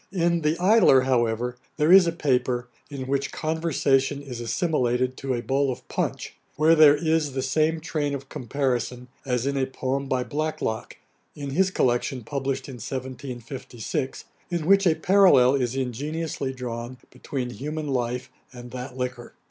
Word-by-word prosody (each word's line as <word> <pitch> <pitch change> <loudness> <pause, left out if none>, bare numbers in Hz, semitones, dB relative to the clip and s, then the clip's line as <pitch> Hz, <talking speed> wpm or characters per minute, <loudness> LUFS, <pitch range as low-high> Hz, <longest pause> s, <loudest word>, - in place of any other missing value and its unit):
In 170 -2 +1
The 155 +2 +1
Idler, 185 - +6
however, 125 -1 0 0.2
there 155 +2 +3
is 190 -2 +8
a - - +2
paper, 125 -6 0 0.2
in 140 -3 -5
which 140 +1 -1
conversation 145 -4 0
is 130 -4 -7
assimilated 125 -1 0
to 135 -2 -2
a 120 - -4
bowl 135 +1 +1
of 125 - -8
punch, - - -3 0.2
where 155 +2 +5
there 155 -2 +7
is 155 -2 0
the 130 -1 -2
same 155 +4 +1
train 150 -3 -2
of 140 0 -8
comparison 125 -1 -2 0.2
as 125 -1 0
in 140 0 0
a 135 -1 0
poem 135 +1 -3
by 130 -1 0
Blacklock, 150 -6 -3 0.4
in 140 -2 -5
his 190 +6 +2
collection 125 -4 0
published 135 +1 -3
in 130 -3 -8
1756, 130 +1 -5 0.2
in 170 -3 -2
which 195 +2 +5
a 160 - +4
parallel 180 -11 +5
is 130 -2 0
ingeniously 135 +3 -3
drawn 125 -1 -6
between 125 -3 -4
human 150 +4 -5
life 125 -2 -2 0.2
and 120 -1 -10
that 125 0 -7
liquor. 125 -1 -4
135 Hz, 155 wpm, -25 LUFS, 125-155 Hz, 0.4 s, is